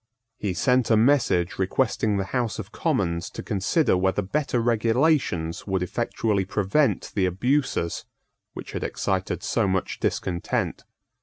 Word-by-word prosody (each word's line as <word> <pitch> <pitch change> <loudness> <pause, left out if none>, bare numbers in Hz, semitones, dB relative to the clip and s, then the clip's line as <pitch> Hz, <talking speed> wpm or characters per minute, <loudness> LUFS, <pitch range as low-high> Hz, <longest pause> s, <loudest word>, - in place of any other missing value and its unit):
He 95 -3 -2
sent 125 +6 +2
a 110 - +5
message 110 -9 +2
requesting 105 +1 +1
the 95 - 0
House 120 -5 0
of - - -7
Commons 85 +1 -1
to - - -8
consider 105 - +1
whether 95 +2 +1
better 130 +4 -1
regulations 115 - +1
would 95 -2 0
effectually 100 +2 -1
prevent 100 +9 0
the 95 -3 +2
abuses 120 - 0 0.5
which - - -8
had - - -4
excited - - -2
so - - +1
much 95 -1 -1
discontent. 90 -2 -2
105 Hz, 135 wpm, -25 LUFS, 95-125 Hz, 0.5 s, a